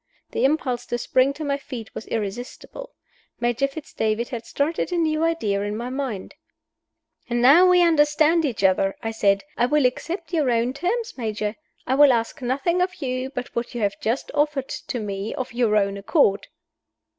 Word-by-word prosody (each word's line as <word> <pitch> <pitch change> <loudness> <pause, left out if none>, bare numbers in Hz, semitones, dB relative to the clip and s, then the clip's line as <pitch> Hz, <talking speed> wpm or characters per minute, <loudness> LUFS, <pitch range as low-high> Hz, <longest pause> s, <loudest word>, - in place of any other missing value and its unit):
The - - +1
impulse 270 -4 0
to 240 - -1
spring 255 +3 +2
to 310 - -7
my 280 -1 0
feet 250 -5 -8
was - - -7
irresistible. 230 - -6 0.4
Major 240 +3 +1
Fitz 285 +2 -10
David 220 +2 -1
had 235 -3 -6
started 315 +5 -1
a 355 - 0
new 315 -1 +1
idea 265 -13 0
in 205 +1 -3
my 240 +2 -4
mind. 260 -8 -4 1.0
"Now 270 +10 +6
we 360 -1 +6
understand 315 0 +4
each 245 -9 -2
other!" 195 +1 +3
I 225 - -2
said. 200 -3 +2
"I 240 - +3
will 295 0 +2
accept 330 +7 -2
your 305 -6 +2
own 235 +1 +1
terms, 440 - -2
Major. 215 -2 -2 0.3
I 260 - 0
will 285 0 +7
ask 230 +2 -1
nothing 280 +8 0
of 370 +1 0
you 255 -3 -3
but 250 -2 -6
what 235 +1 -3
you 240 - -3
have 200 -1 -1
just 230 +5 -2
offered 295 -2 0
to 245 - -5
me 200 0 -4
of 255 -4 -5
your 235 -3 +2
own 200 -1 +1
accord." 200 - +2
255 Hz, 180 wpm, -23 LUFS, 225-300 Hz, 1.0 s, will